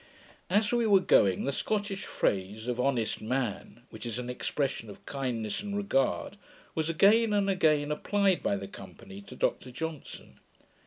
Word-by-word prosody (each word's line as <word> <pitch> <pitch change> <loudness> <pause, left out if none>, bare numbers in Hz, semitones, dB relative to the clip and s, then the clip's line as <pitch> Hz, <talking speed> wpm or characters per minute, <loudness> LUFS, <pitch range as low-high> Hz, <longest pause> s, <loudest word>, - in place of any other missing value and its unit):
As 205 +2 +2
we 240 -2 +2
were 200 -2 +6
going, 100 - +4
the 140 - 0
Scottish 200 +4 -2
phrase 100 +3 -1
of 125 0 -2
'honest 125 -4 0
man!' 120 -1 -3
which 110 -2 -9
is 120 -1 -3
an 125 0 -4
expression 130 -3 -2
of 100 - -12
kindness 125 - -3
and 205 -1 -4
regard, 135 - 0 0.4
was 160 0 -1
again 210 +6 +4
and 200 -1 +2
again 155 -6 +2
applied 195 +4 +1
by - - +1
the 100 0 -5
company 95 +1 -11
to 100 - -12
Dr 130 - -1
Johnson. 160 +3 -7
140 Hz, 160 wpm, -29 LUFS, -, 0.4 s, were